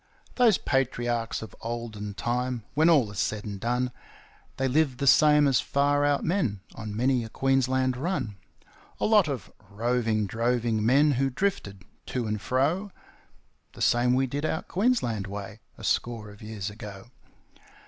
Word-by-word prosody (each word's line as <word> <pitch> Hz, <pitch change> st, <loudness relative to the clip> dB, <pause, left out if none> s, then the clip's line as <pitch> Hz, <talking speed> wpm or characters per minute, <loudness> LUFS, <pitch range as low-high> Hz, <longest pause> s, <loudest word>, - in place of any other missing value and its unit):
Those 235 Hz, -6 st, +4 dB
Patriarchs 120 Hz, -4 st, -1 dB
of 110 Hz, -, -10 dB
olden 110 Hz, -3 st, -5 dB
time, 125 Hz, +1 st, -2 dB
when 160 Hz, +3 st, +4 dB
all 135 Hz, -11 st, +4 dB
is 100 Hz, -, -6 dB
said 105 Hz, -1 st, -1 dB
and 100 Hz, -2 st, -5 dB
done, 125 Hz, +3 st, -1 dB, 0.7 s
They 135 Hz, -, +1 dB
lived 135 Hz, -1 st, +1 dB
the 140 Hz, -, -2 dB
same 150 Hz, +1 st, +6 dB
as 130 Hz, -5 st, +3 dB
far 145 Hz, +1 st, +1 dB
out 145 Hz, -1 st, +2 dB
men 140 Hz, -, 0 dB
on 110 Hz, -2 st, -7 dB
many 125 Hz, +1 st, +2 dB
a 110 Hz, -, -7 dB
Queensland 130 Hz, 0 st, +1 dB
run 135 Hz, -, -2 dB, 0.6 s
A -, -, +1 dB
lot 210 Hz, -5 st, +5 dB
of 135 Hz, -6 st, -5 dB, 0.2 s
roving, 115 Hz, 0 st, 0 dB
droving 115 Hz, +1 st, 0 dB
men 140 Hz, +6 st, +4 dB
who 135 Hz, 0 st, +1 dB
drifted 115 Hz, -, -2 dB, 0.2 s
to 125 Hz, -2 st, -2 dB
and 105 Hz, -1 st, -2 dB
fro, 155 Hz, -, 0 dB, 0.8 s
The -, -, -11 dB
same 125 Hz, +1 st, +3 dB
we 135 Hz, +1 st, +2 dB
did 140 Hz, +3 st, -4 dB
out 160 Hz, 0 st, -2 dB
Queensland 175 Hz, -, 0 dB
way 100 Hz, +1 st, -7 dB, 0.2 s
a -, -, -12 dB
score 115 Hz, -3 st, -1 dB
of 105 Hz, -, -16 dB
years 105 Hz, -2 st, -5 dB
ago. 105 Hz, 0 st, -10 dB
125 Hz, 160 wpm, -27 LUFS, 110-140 Hz, 0.8 s, same